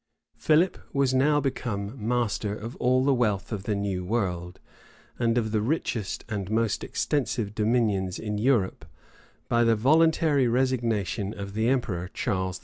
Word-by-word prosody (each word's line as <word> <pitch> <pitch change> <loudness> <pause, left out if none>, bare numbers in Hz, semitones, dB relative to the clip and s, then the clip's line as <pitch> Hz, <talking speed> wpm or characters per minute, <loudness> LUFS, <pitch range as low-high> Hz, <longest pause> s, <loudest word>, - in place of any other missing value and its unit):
Philip 160 +4 +2
was 140 -2 +2
now 145 +3 +3
become 115 -6 -3
master 110 -3 -1
of 115 +5 -7
all 130 +1 +2
the 140 - +4
wealth 105 -7 0
of 100 -3 -4
the 105 - 0
new 100 -2 -2
world, 90 -4 -2 0.6
and 115 -1 +2
of 110 -2 0
the 110 -1 +1
richest 115 -5 -2
and 100 -4 -4
most 110 -1 0
extensive 120 -8 -1
dominions 105 -4 +1
in 105 -1 -3
Europe, 110 - +1 0.6
by 120 0 +3
the 115 -1 +4
voluntary 150 +2 +3
resignation 115 -5 0
of 100 0 -6
the 110 +2 0
emperor 95 -9 -1
Charles 95 -1 -1
V. - - -17
115 Hz, 150 wpm, -26 LUFS, 100-130 Hz, 0.6 s, the